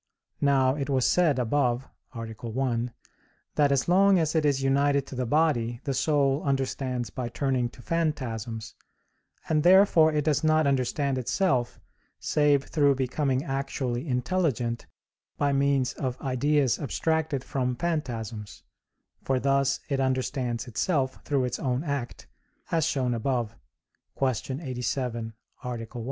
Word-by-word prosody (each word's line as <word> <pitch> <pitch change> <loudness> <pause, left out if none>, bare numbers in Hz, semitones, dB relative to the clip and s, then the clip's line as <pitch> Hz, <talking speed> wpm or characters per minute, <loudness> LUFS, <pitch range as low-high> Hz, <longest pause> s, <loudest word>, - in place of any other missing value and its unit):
Now 135 -2 +3
it 140 0 -3
was 130 -3 +2
said 165 -7 +3
above 125 0 0 0.3
(A. 115 - -5
1), 120 +2 -2 0.6
that 145 -1 +3
as 140 -1 +1
long 195 +2 +5
as 160 -2 +1
it 160 -2 +2
is 140 -2 +1
united 140 +1 +2
to - - -9
the 125 -1 -2
body 120 -5 +1
the 140 - -1
soul 140 +1 +2
understands 130 -4 -2
by 125 -2 -4
turning 125 -1 0
to 120 - -16
phantasms, 120 -9 -2 0.7
and 155 -1 +2
therefore 175 -2 +6
it 150 -1 0
does 155 0 +1
not 155 0 +3
understand 140 0 0
itself 125 - 0 0.4
save 145 -2 +2
through 145 -3 +2
becoming 130 +1 0
actually 135 -2 -3
intelligent 125 -3 -1 0.5
by 140 -1 +1
means 140 -2 +2
of 130 -2 -4
ideas 135 0 +1
abstracted 155 -1 -1
from 125 -2 -1
phantasms; 120 -10 -4 0.6
for 130 -1 0
thus 135 0 +1
it 140 -2 -1
understands 130 -2 -1
itself 130 - -1
through 140 -3 +1
its 125 -1 -2
own 130 +1 -1
act, 140 -6 -4 0.5
as 165 -2 +2
shown 130 -6 0
above 120 -2 -1 0.6
(Q. 130 -2 +2 0.3
87, 125 -4 -3 0.3
A. - - -5
1). 115 -2 -5
135 Hz, 135 wpm, -27 LUFS, 125-145 Hz, 0.7 s, therefore